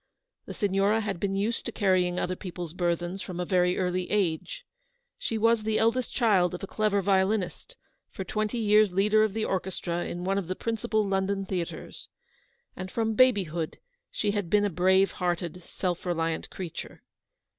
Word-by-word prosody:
The - - -7
Signora 200 +2 +2
had 200 -5 -3
been 195 +1 -1
used 210 +4 0
to - - -3
carrying 185 -4 +2
other 185 - -1
people's 175 -3 -6
burthens 175 +1 -1
from 180 -2 -6
a 180 - -1
very 180 0 +2
early 180 0 -1
age. 210 - -1 0.5
She 225 - -2
was 230 +1 +3
the 215 0 0
eldest 230 +3 +1
child 190 -7 +3
of 180 - -9
a - - 0
clever 205 -1 0
violinist, 195 - 0 0.3
for 190 - -6
twenty 215 +4 -2
years 210 -2 +4
leader 210 +3 +4
of 215 -1 0
the 220 - 0
orchestra 175 -2 -2
in 175 +1 -5
one 195 +2 +1
of 185 - -5
the 185 - -2
principal 220 -1 -1
London 195 0 0
theatres; 180 -3 -5 0.7
and 185 0 -6
from 225 +2 0
babyhood 195 -10 +2 0.3
she 210 - -1
had 205 -4 -2
been 205 +2 +4
a 205 - 0
brave 190 +3 +3
hearted, 175 -1 -2
self 180 -3 -3
reliant 165 -2 -1
creature. 180 -4 -7
195 Hz, 170 wpm, -28 LUFS, 180-215 Hz, 0.7 s, years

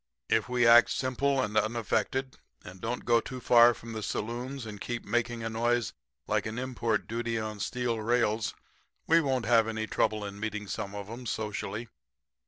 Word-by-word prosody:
If 110 +2 +2
we 125 -1 +2
act 120 +1 +8
simple 135 +1 0
and 105 -4 -1
unaffected 115 +4 0 0.2
and 90 +1 -11
don't 120 +2 -3
go 120 -1 +5
too 130 +2 -7
far 120 0 +6
from 115 +1 -9
the 110 - -4
saloons 120 +5 -4
and 105 -2 -8
keep 120 -1 -4
making 120 +1 -1
a 115 - -2
noise 120 0 0 0.3
like - - 0
an 110 +2 -5
import 120 -4 -1
duty 115 0 -2
on 110 -1 -4
steel 120 0 -1
rails 115 -1 +1 0.5
we 165 +1 +5
won't 130 -5 0
have 115 -1 +4
any 110 0 -2
trouble 110 -1 0
in 100 0 -7
meeting 105 -1 -3
some 100 +1 -4
of 100 -1 -6
'em 120 +3 -7
socially.' 105 +1 -3
115 Hz, 180 wpm, -29 LUFS, 110-120 Hz, 0.5 s, act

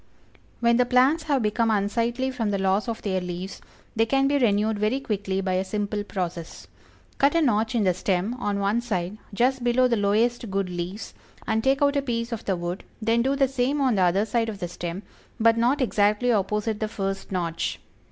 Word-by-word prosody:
When 235 0 +4
the 250 - +4
plants 265 +6 +3
have 280 -5 +1
become 225 +2 +1
unsightly 230 +5 0
from 230 -4 -2
the 200 - 0
loss 195 +3 +1
of 230 -1 -4
their 190 -3 -1
leaves, 180 +2 -6 0.3
they 225 0 +2
can 270 +2 +2
be 285 0 +2
renewed 215 -2 +2
very 215 +6 +1
quickly 200 -6 -2
by 190 -1 -1
a 185 +1 +1
simple 205 +1 -3
process. 180 -4 -5 0.5
Cut 280 +3 +3
a 335 - +4
notch 225 -2 +1
in 225 - +2
the 185 -2 +3
stem, 185 +4 -1
on 205 -4 -1
one 200 +4 +1
side, 205 -3 -3
just 250 +4 +1
below 245 +1 +3
the 235 -2 +1
lowest 225 +3 +1
good 195 -1 -1
leaves, 175 +4 -5 0.3
and 220 0 0
take 270 +2 +2
out 285 0 +3
a 280 - +2
piece 235 -3 -3
of 230 - -4
the 190 - +1
wood, 175 +2 -4 0.2
then 230 +1 +2
do 270 +3 +1
the 275 -1 +3
same 270 +2 0
on 265 -3 +2
the 195 - +1
other 185 +3 +3
side 225 +1 0
of 210 - -5
the 175 - -4
stem, 175 +2 -6 0.4
but 230 0 +5
not 245 +5 +2
exactly 215 0 +2
opposite 210 +1 0
the 215 - -1
first 195 -2 -4
notch. 170 -3 -2
220 Hz, 210 wpm, -25 LUFS, 195-245 Hz, 0.5 s, but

